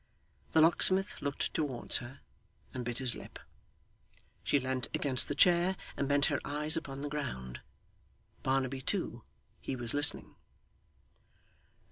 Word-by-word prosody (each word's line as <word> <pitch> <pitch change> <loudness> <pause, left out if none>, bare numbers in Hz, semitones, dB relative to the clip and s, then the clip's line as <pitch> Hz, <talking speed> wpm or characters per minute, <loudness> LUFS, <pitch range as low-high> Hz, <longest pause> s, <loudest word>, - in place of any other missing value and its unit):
The 160 - +5
locksmith 185 +4 +5
looked 140 0 -3
towards 140 -6 +1
her, 130 +3 -10 0.5
and 125 - -5
bit 120 0 -4
his 130 -3 +1
lip. - - -10 1.1
She 145 - +2
leant 130 -1 -3
against 130 -3 +2
the 145 - -3
chair, 175 +4 +3 0.2
and 140 - -2
bent 145 0 +3
her - - 0
eyes 150 +2 +3
upon 140 -3 -5
the - - -3
ground. 125 - -6 0.8
Barnaby 130 0 -1
too 130 - -3 0.4
he 135 - -5
was 120 -2 -4
listening. 145 +1 +1
140 Hz, 130 wpm, -31 LUFS, 130-150 Hz, 1.1 s, The